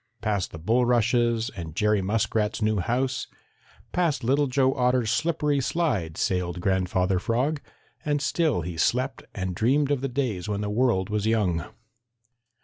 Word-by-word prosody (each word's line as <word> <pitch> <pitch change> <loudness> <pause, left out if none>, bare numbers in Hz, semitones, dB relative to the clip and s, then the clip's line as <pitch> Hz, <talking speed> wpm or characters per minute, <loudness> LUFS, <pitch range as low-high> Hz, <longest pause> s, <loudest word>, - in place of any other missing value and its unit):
Past 105 -3 -1
the - - -9
bulrushes 120 +3 +2
and 80 -4 -8
Jerry 105 0 +2
Muskrat's 105 +2 0
new 110 -1 +1
house, 125 +7 -1 0.6
past 165 -7 0
Little 140 +4 +2
Joe 130 0 +2
Otter's 125 -3 +1
slippery 150 -3 +1
slide 120 - -1
sailed 90 -1 -1
Grandfather 95 0 +1
Frog, 130 +9 0 0.4
and 145 -1 0
still 145 - +1
he 85 0 -6
slept 130 +9 0
and 95 -2 -3
dreamed 135 +9 +2
of 140 -3 +1
the 135 - -2
days 120 -8 -2
when 100 0 -2
the 105 0 -2
world 105 -4 +1
was 105 0 0
young. 95 -8 +1
115 Hz, 145 wpm, -26 LUFS, 95-135 Hz, 0.6 s, bulrushes